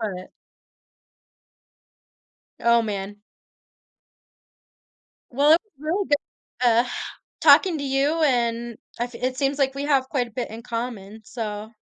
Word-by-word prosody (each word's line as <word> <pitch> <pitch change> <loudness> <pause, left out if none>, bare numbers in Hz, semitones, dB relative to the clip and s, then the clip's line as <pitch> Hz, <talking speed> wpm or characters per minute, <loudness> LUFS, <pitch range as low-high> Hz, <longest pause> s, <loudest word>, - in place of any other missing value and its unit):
but 190 -4 -5 2.3
Oh, 235 0 +4
man. 205 -2 -4 2.1
Well, 285 +5 +3
it 330 - +6
was 425 - -39
really 350 +6 -1
good, 285 -3 -2
uh, 235 +1 +4 0.6
talking 360 -5 +6
to 285 - -4
you 280 +4 +1
and 235 -3 0 0.2
I 240 - +1
f 245 -1 -12
it 255 +2 -2
seems 275 +1 0
like 270 -1 +1
we 280 - -3
have 275 -3 +1
quite 250 -3 0
a - - -16
bit 245 +3 -4
in 225 +1 -8
common, 230 -3 -5
so 215 -2 -5
245 Hz, 130 wpm, -24 LUFS, 230-280 Hz, 2.3 s, it